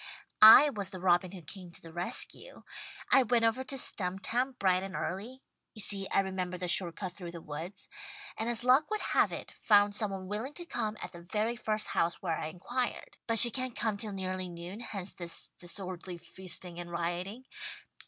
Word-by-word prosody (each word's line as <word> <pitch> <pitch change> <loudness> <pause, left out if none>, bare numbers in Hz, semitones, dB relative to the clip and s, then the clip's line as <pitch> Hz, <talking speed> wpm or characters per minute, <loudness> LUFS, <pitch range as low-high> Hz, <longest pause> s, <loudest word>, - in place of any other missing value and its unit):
"I 240 +7 +10
was 200 -5 -3
the 185 -1 -8
robin 175 0 +2
who 185 -3 -10
came 180 +4 -10
to - - -9
the 165 -1 -13
rescue. 175 +1 -3 0.5
I 270 - +7
went 240 -1 +2
over 230 +3 +1
to 270 - -5
Stumptown 235 +5 0
bright 185 -1 +2
and 195 0 -6
early 230 +9 -5 0.3
you 215 - -4
see 195 -2 -1
I - - +3
remembered 185 -2 -4
the 180 - -1
short 175 -1 +4
cut 185 -3 -5
through 180 -2 -8
the 170 - -7
woods 165 +6 -7 0.5
and 225 +2 -2
as 240 0 +2
luck 255 +4 +4
would 430 -1 -2
have - - +4
it, - - -7
found 205 -1 +3
some 210 -1 -2
one 190 -1 -6
willing 220 +9 -4
to 345 - -6
come, 215 -10 -3
at - - -6
the 170 -2 -11
very 215 +6 -1
first 215 -1 -2
house 170 +1 0
where 165 -4 -2
I - - -3
inquired. 240 +10 -4
(But 230 -1 +1
she 240 +1 +9
can't 255 -1 -3
come 220 -3 0
till 210 0 -5
nearly 185 -1 -4
noon, 175 +4 -8
hence 200 -5 -4
this 170 -1 0
disorderly 180 0 -3
feasting 180 0 -2
and 175 0 -7
rioting.) 175 +8 -4
195 Hz, 200 wpm, -31 LUFS, 180-225 Hz, 0.5 s, I